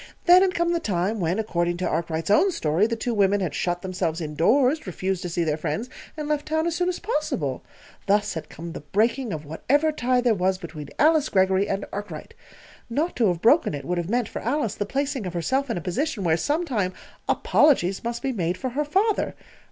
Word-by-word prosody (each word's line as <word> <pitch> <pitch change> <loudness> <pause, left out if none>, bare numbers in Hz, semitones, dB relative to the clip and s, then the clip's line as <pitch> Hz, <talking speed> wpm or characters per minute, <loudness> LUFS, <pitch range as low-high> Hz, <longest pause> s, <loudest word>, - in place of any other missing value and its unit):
Then 360 +1 +8
had 375 -2 +2
come 340 0 +1
the 340 - +1
time 200 - -1
when, 175 +1 0
according 175 -5 -1
to 185 - -1
Arkwright's 165 +1 -2
own 375 - +5
story, 170 - +1
the 230 - -2
two 235 +1 -2
women 205 -1 +3
had 180 -6 -2
shut 175 +2 -2
themselves 180 -3 -2
indoors, 240 - +2
refused 185 +1 -2
to 175 - -4
see 170 0 0
their 155 -2 0
friends, 230 +9 -3 0.3
and 300 -1 -4
left 300 -1 -1
town 315 +1 0
as 340 -1 -1
soon 360 +1 +1
as 360 - -2
possible. 180 - -2 0.5
Thus 205 +1 +2
had 160 -3 -6
come 170 +1 -8
the - - -6
breaking 225 - 0
of 155 -3 -5
whatever 285 - +1
tie 255 -3 +1
there 245 -2 +3
was 185 -1 +1
between 160 -5 -8
Alice 310 -1 +4
Greggory 190 0 +2
and 195 0 -2
Arkwright. 200 -6 -6 0.6
Not 305 +9 -1
to 230 -3 +3
have 175 -2 -1
broken 240 - +4
it 140 -1 -7
would 180 0 -1
have 170 +1 -4
meant, 240 -1 +1
for - - -6
Alice, 240 -3 -1
the 205 - -3
placing 270 -4 -2
of 175 - -6
herself 265 +11 0
in 230 - -1
a - - -3
position 220 - -2
where, 165 -2 +3
sometime, 250 - -1 0.4
apologies 195 - +3
must 235 0 -4
be 270 - 0
made 180 -6 -1
for 255 - -3
her 280 +5 -1
father. 395 +8 +1
205 Hz, 215 wpm, -24 LUFS, 175-280 Hz, 0.6 s, Then